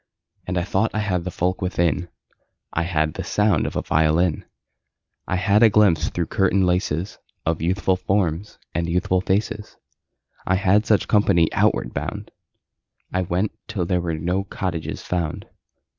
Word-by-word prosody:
And 90 Hz, 0 st, -2 dB
I 90 Hz, -, +1 dB
thought 100 Hz, +4 st, +1 dB
I -, -, +1 dB
had 90 Hz, -5 st, -1 dB
the -, -, -2 dB
folk 90 Hz, +1 st, -1 dB
within: 85 Hz, -1 st, 0 dB, 0.6 s
I 80 Hz, -, +1 dB
had 80 Hz, -3 st, 0 dB
the -, -, -5 dB
sound 105 Hz, -6 st, +1 dB
of -, -, -6 dB
a -, -, -1 dB
violin; 80 Hz, +2 st, +2 dB, 0.8 s
I -, -, 0 dB
had 100 Hz, +4 st, +3 dB
a 115 Hz, -, +8 dB
glimpse 90 Hz, -8 st, +3 dB
through 85 Hz, -, -2 dB
curtain 95 Hz, +2 st, +2 dB
laces 90 Hz, 0 st, -1 dB, 0.3 s
Of 80 Hz, -1 st, 0 dB
youthful 95 Hz, +2 st, +1 dB
forms 95 Hz, 0 st, -1 dB, 0.2 s
and 85 Hz, 0 st, -1 dB
youthful 90 Hz, +1 st, +1 dB
faces. 105 Hz, +2 st, -2 dB, 0.7 s
I 95 Hz, -, +1 dB
had 100 Hz, +2 st, +3 dB
such 105 Hz, -, +2 dB
company 95 Hz, -6 st, +3 dB
outward -, -, +1 dB
bound. -, -, -5 dB, 0.8 s
I 95 Hz, -, +1 dB
went 90 Hz, +3 st, -1 dB, 0.2 s
till 100 Hz, -6 st, -2 dB
there 90 Hz, 0 st, 0 dB
were 85 Hz, -2 st, -2 dB
no 90 Hz, +5 st, -1 dB
cottages 90 Hz, -4 st, -4 dB
found. 85 Hz, -4 st, -3 dB
90 Hz, 160 wpm, -22 LUFS, 85-100 Hz, 0.8 s, a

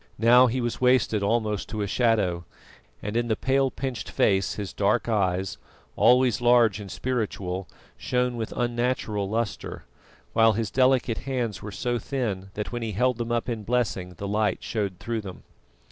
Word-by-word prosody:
Now 120 Hz, +3 st, +6 dB
he 125 Hz, +2 st, -1 dB
was 120 Hz, +1 st, -3 dB
wasted 125 Hz, -4 st, +3 dB
almost 105 Hz, -1 st, 0 dB
to 105 Hz, -2 st, -2 dB
a -, -, -2 dB
shadow, 100 Hz, -6 st, +1 dB, 0.6 s
and 105 Hz, +1 st, -4 dB
in 120 Hz, 0 st, +1 dB
the 110 Hz, -, +1 dB
pale 135 Hz, +3 st, +1 dB
pinched 130 Hz, -4 st, -5 dB
face 95 Hz, -1 st, +1 dB
his 100 Hz, -3 st, -5 dB
dark 105 Hz, +5 st, +1 dB
eyes, 95 Hz, -, 0 dB, 0.4 s
always 125 Hz, -1 st, +4 dB
large 120 Hz, -4 st, +4 dB
and 100 Hz, -2 st, -8 dB
spiritual, 100 Hz, -7 st, -3 dB, 0.3 s
shone 125 Hz, 0 st, 0 dB
with 115 Hz, -2 st, -4 dB
unnatural 120 Hz, -4 st, -1 dB
lustre, 115 Hz, 0 st, -3 dB, 0.5 s
while 115 Hz, -1 st, +5 dB
his 110 Hz, -2 st, -2 dB
delicate 130 Hz, -3 st, +2 dB
hands 125 Hz, -5 st, -3 dB
were 105 Hz, -, -7 dB
so 120 Hz, +3 st, -2 dB
thin 105 Hz, -7 st, -3 dB
that 105 Hz, -, -4 dB
when 120 Hz, -1 st, -4 dB
he 110 Hz, -2 st, -3 dB
held 125 Hz, +3 st, +1 dB
them 120 Hz, 0 st, -3 dB
up 120 Hz, 0 st, 0 dB
in 115 Hz, -3 st, -3 dB
blessing 100 Hz, -6 st, -1 dB
the 100 Hz, -, -5 dB
light 105 Hz, +1 st, 0 dB
showed 100 Hz, -5 st, -2 dB
through 115 Hz, -1 st, -3 dB
them. 95 Hz, -3 st, -9 dB
115 Hz, 170 wpm, -26 LUFS, 100-125 Hz, 0.6 s, Now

